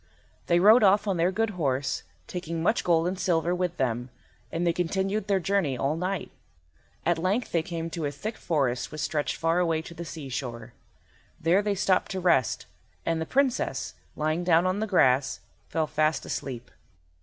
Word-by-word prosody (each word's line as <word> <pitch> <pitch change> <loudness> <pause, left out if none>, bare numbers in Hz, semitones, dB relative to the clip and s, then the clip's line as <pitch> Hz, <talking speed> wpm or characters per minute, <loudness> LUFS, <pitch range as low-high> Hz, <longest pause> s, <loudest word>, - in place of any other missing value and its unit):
They 170 0 +4
rode 215 +6 +7
off 205 +1 +4
on 195 -3 +1
their 170 +2 +2
good 225 +3 0
horse, 140 -7 -1 0.2
taking 170 -2 -4
much 220 - +2
gold 170 -1 +3
and 185 +1 -3
silver 175 -2 +1
with 180 -1 -1
them, 125 -1 -1 0.4
and 170 +2 -1
they 170 - +3
continued 190 +4 -1
their 200 -1 +2
journey 175 -7 0
all 135 +5 0
night. 185 +3 -3 0.7
At 170 -1 +2
length 195 +8 0
they 165 - +2
came 165 0 -5
to 165 -2 -3
a - - -3
thick 210 +11 -5
forest 135 -7 -1
which 155 - -5
stretched 150 0 -1
far 165 +2 +1
away 165 -2 +1
to 170 - -9
the 170 0 -6
seashore. 125 -7 -6 0.7
There 170 +5 +3
they 205 -1 0
stopped 185 -1 +2
to 190 - -2
rest, 170 -9 +2 0.4
and 165 -1 0
the 160 - -3
Princess, 270 -2 0 0.2
lying 155 +3 0
down 170 0 +4
on 185 +2 +1
the 220 - -1
grass, 135 -9 +3 0.3
fell 160 -1 0
fast 155 +1 0
asleep. 125 -3 -5
170 Hz, 180 wpm, -27 LUFS, 155-185 Hz, 0.7 s, rode